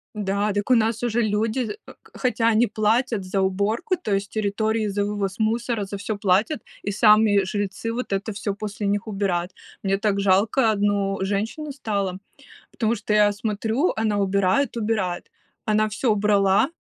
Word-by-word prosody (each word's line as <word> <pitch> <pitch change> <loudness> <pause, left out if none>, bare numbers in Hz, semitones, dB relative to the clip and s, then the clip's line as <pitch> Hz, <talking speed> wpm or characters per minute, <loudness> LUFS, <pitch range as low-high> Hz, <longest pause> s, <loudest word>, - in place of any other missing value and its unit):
Да, 205 0 -1
дак 205 +4 -1
у - - +7
нас 225 0 +1
уже 240 0 +1
люди, 215 +2 0 0.3
э - - -11 0.2
хотя 245 -3 0
они 230 +1 +4
платят 220 +1 +1
за 190 +1 -1
уборку, 200 - 0
то 215 - -3
есть 195 0 -1
территории 215 +1 0
за 200 +1 -1
вывоз 200 -2 -2
мусора, 225 -1 0
за 200 - -6
всё 205 +1 -4
платят, 205 +8 +1 0.3
и - - +1
сами 215 +1 +5
жильцы 205 +3 -3
вот 245 -3 -4
это 195 +3 -2
всё 200 0 -3
после 205 0 -4
них 205 +2 -1
убирают. 195 -4 -1 0.3
Мне 195 0 +1
так 205 -1 0
жалко 205 +5 +3
одну 200 -1 0
женщину 215 +10 -2
стало, 200 -8 -2 0.5
потому 230 0 0
что 210 - -3
я 210 -1 +5
смотрю, 220 - -1
она 215 -2 +1
убирает, 200 +6 +1
убирает, 210 -6 -2 0.4
она 215 0 +3
всё 210 +5 -4
убрала, 205 +2 +3
210 Hz, 165 wpm, -23 LUFS, 200-225 Hz, 0.5 s, у